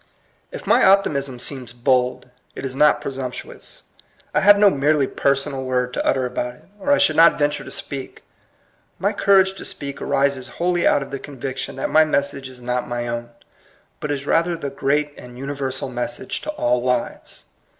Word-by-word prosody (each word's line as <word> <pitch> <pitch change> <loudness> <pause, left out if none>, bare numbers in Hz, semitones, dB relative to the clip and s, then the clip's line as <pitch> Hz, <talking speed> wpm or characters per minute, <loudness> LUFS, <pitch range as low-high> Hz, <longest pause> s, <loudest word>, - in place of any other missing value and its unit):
If - - -8
my - - +4
optimism 140 -10 +3
seems 125 -1 -4
bold, 125 0 0 0.2
it - - -6
is 130 -1 -5
not 150 +1 +4
presumptuous. 130 -3 -7 0.5
I - - +3
have 205 +1 +7
no 205 -1 +6
merely 145 0 +2
personal 140 0 -1
word 125 -1 -1
to - - -1
utter 130 -1 +1
about 125 0 -3
it, - - -22
or 285 - 0
I 285 - +6
should 155 - +3
not 165 +1 +6
venture 145 0 0
to - - -9
speak. 135 -2 -6 0.7
My - - 0
courage 195 -1 +4
to 195 - -9
speak 140 -1 -6
arises 140 -2 0
wholly 175 0 +1
out 140 - +3
of 135 - -12
the 135 - -4
conviction 135 -2 -6
that 135 - -3
my 155 - +6
message 140 -3 -1
is 125 -1 -11
not 125 0 -2
my 120 0 -3
own, 120 0 -4 0.7
but 150 - -4
is 140 -1 -2
rather 170 +3 +1
the 140 -4 -5
great 145 +1 0
and 125 0 -12
universal 135 -1 -3
message 125 +3 -4
to - - -6
all 125 - +1
lives. 125 -1 -3
135 Hz, 180 wpm, -21 LUFS, 125-150 Hz, 0.7 s, have